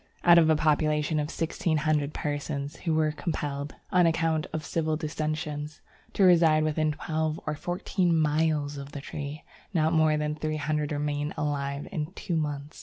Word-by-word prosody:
Out 175 -1 +8
of 160 -1 +4
a 160 - +5
population 155 0 +2
of 150 0 -2
sixteen 165 -1 -1
hundred 150 -2 +1
persons 145 0 -3
who 165 -3 -1
were 155 -1 +2
compelled, 145 -3 -4 0.2
on 180 -2 +5
account 165 -1 +1
of 155 -1 -4
civil 160 -2 0
dissensions, 155 -1 -3 0.3
to 200 - +2
reside 165 -4 +6
within 155 0 +1
twelve 155 +1 -2
or 155 - -1
fourteen 175 +2 0
miles 150 -1 +1
of 140 0 -8
the 140 - -5
tree, 145 +1 -6 0.3
not 160 0 +3
more 155 -1 +4
than 150 0 -1
three 155 0 -3
hundred 150 0 -1
remained 145 0 -2
alive 140 -1 -2
in 155 -3 -3
two 180 -3 -3
months. 150 -1 -3
155 Hz, 170 wpm, -28 LUFS, 150-160 Hz, 0.3 s, Out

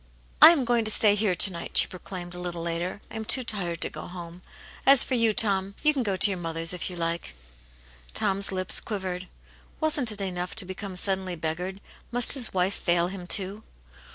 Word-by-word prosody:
" - - -30
I - - +12
am 310 -7 +2
going 240 -1 +1
to - - +3
stay 210 -1 +5
here 205 -3 0
to 195 - +4
night," 170 -1 -5
she - - +7
proclaimed 180 -1 -9
a 180 - -1
little 175 -1 -5
later. 170 +3 -4
" - - -30
I - - -7
am 220 - -5
too 255 +4 +3
tired 180 -7 -4
to - - +1
go - - -9
home. 175 0 -10 0.4
As 275 -1 +8
for - - -5
you, 230 -3 +2
Tom, 200 -2 -1
you 305 0 +4
can 275 - -2
go 200 -5 -2
to 195 +2 +4
your 185 - -4
mother's 165 0 -2
if 180 - -3
you 180 - -8
like.'* 170 - -4 0.8
Tom*s 195 0 0
lips 185 -1 +3
quivered. 185 -3 -6 0.5
Wasn't 295 -7 0
it 210 - -7
enough 180 -2 -4
to 220 - -1
become* 190 +1 -8
suddenly 190 -1 -2
beggared; 175 +4 -5 0.3
must 245 0 +4
his 255 -5 +1
wife 185 +1 0
fail 175 -1 0
him, 185 -2 -9
too 195 +2 +2
190 Hz, 215 wpm, -25 LUFS, 175-215 Hz, 0.8 s, I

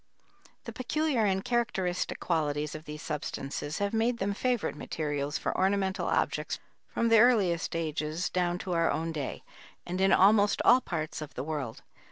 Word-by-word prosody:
The - - -7
peculiar 265 -2 0
and 190 -1 0
characteristic 205 -7 -1
qualities 150 -3 -1
of 155 +1 -8
these 150 0 -7
substances 150 0 -4
have 200 +1 -1
made 230 +2 +1
them 200 0 -1
favorite 245 - -1
materials 145 -2 -3
for - - -2
ornamental 190 0 +1
objects - - 0 0.3
from 230 - 0
the 225 -1 +7
earliest 200 -10 +3
ages 160 +1 -2
down 175 -1 0
to 185 - -2
our 165 -1 +2
own 165 +1 -1
day, 145 -4 -4 0.4
and 180 +2 -3
in 195 - +4
almost 205 +1 +5
all 250 +2 +7
parts 155 -7 -4
of 155 -1 -8
the 130 - -3
world. 145 -6 -4
180 Hz, 165 wpm, -29 LUFS, 155-205 Hz, 0.4 s, the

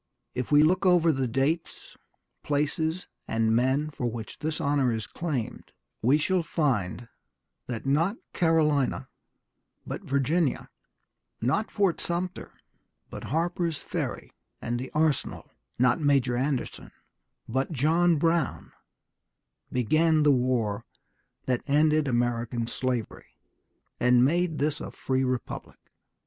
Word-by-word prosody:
If 125 +1 -4
we 145 0 +7
look 180 +5 +3
over 175 -3 +5
the 135 -3 -1
dates, 135 +8 -2 0.5
places, 160 +4 -1 0.2
and 115 0 +1
men 135 +5 +1
for 125 -4 -2
which 115 -1 -7
this 155 0 -2
honor 140 -3 +2
is 110 -2 -3
claimed, 145 -10 -4 0.3
we 130 +6 +4
shall 185 +4 +1
find 120 - -1 0.6
that 120 -1 -5
not 165 - +1 0.2
Carolina, 155 -5 +2 0.8
but - - -5
Virginia, 140 +3 0 0.7
not 135 - 0
Fort 195 -5 +1
Sumter, 175 +1 -3 0.6
but - - -7
Harper's 170 +1 -1
Ferry - - -4 0.3
and 120 +1 -3
the 130 - -5
arsenal, 155 -3 0 0.3
not 125 0 +3
Major 135 -4 +2
Anderson, 130 +1 -2 0.6
but 135 +5 -1
John 165 +4 +3
Brown 165 0 0 1.0
began 155 +6 +3
the 145 - +5
war 120 -5 +1 0.6
that 125 -2 0
ended 150 +1 +3
American 120 -1 0
slavery, 125 -1 -4 0.6
and 125 0 +5
made 170 +2 +1
this 150 +1 -1
a - - -5
free 130 0 -1
republic.... 130 -2 -4
140 Hz, 115 wpm, -27 LUFS, 125-160 Hz, 1.0 s, we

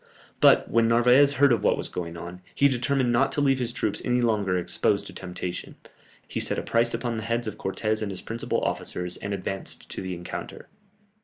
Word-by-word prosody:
But - - +5
when 115 0 +3
Narvaez 125 +5 +5
heard 140 -1 +4
of 115 - -1
what - - +3
was - - -2
going 85 -1 -5
on, 90 +2 -8
he 140 - +5
determined 130 -1 +1
not 120 - +2
to 150 - -1
leave 135 -2 +3
his 120 -2 -1
troops 120 - -1
any 125 0 +1
longer 105 -6 +1
exposed 100 +3 0
to 95 - -9
temptation; 90 0 -6 0.5
he - - -4
set - - 0
a - - -2
price 115 0 +2
upon 120 -1 -3
the 110 - -4
heads 115 +1 -1
of 105 -1 -5
Cortès 110 +3 -1
and 105 - -2
his 95 -2 -6
principal 115 +1 -2
officers, 90 0 -1
and 100 - -5
advanced 95 0 -4
to - - -6
the 95 -1 -4
encounter. 85 0 -8
115 Hz, 210 wpm, -26 LUFS, 95-120 Hz, 0.5 s, But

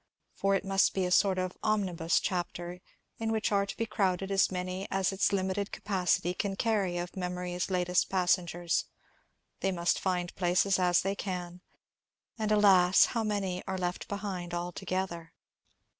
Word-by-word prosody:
For 195 0 +1
it 195 - -2
must 195 0 +2
be 190 -1 +1
a 180 - -2
sort 190 0 +4
of 185 0 -2
omnibus 185 -6 +1
chapter, 175 -1 -3 0.4
in 225 0 -1
which 220 -1 0
are 200 -1 +2
to - - -6
be 230 - 0
crowded 195 -3 0
as 195 -1 +3
many 185 +1 -4
as 195 0 +1
its 195 0 +1
limited 195 +1 -1
capacity 180 -3 0
can 195 +1 -2
carry 195 -5 0
of 175 0 -5
memory's 180 -1 -3
latest 180 -1 +1
passengers. 175 -2 +1 0.7
They 195 - 0
must 175 -1 +1
find 180 -2 -1
places 180 +2 +2
as 180 -1 +3
they 195 +1 0
can. 180 -3 -5 0.8
And 215 -1 0
alas, 190 -4 +6
how 230 -2 0
many 195 -4 -1
are 190 -1 -2
left 180 0 -3
behind 190 -4 -4
altogether 175 -1 -4
185 Hz, 160 wpm, -30 LUFS, 180-195 Hz, 0.8 s, alas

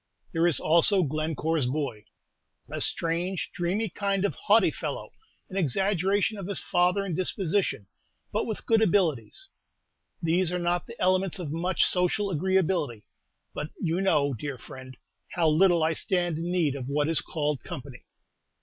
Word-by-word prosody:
There 165 +1 +3
is 160 -8 +2
also 170 +4 +4
Glencore's 155 -1 -1
boy, 130 -6 -3 0.6
a - - -5
strange, 170 +3 -1
dreamy 190 +6 -1
kind 200 +1 -1
of - - 0
haughty 415 - +3
fellow, - - -5 0.4
an 190 - -6
exaggeration 195 - +1
of 190 - -6
his 200 - +1
father 180 +3 +1
in 185 - -3
disposition, 185 - 0 0.5
but - - 0
with 220 - -5
good 225 -1 +3
abilities. 190 - +1 0.7
These 170 +1 +1
are 180 - -1
not 175 0 -1
the 235 - -11
elements 185 0 +2
of 170 -6 -5
much 175 +4 +1
social 190 +3 +1
agreeability; 170 - 0 0.5
but 150 - -4
you 170 +2 0
know, 145 -7 +2
dear 140 +3 -5
friend, 130 0 -11 0.4
how 170 -3 +2
little 170 +1 +4
I 160 +1 +2
stand 175 -2 -1
in 170 +1 -3
need 170 -6 +1
of 130 -2 -5
what 145 +1 0
is 165 -3 +3
called 150 -4 -2
company. 130 -1 -8
175 Hz, 155 wpm, -27 LUFS, 150-190 Hz, 0.7 s, also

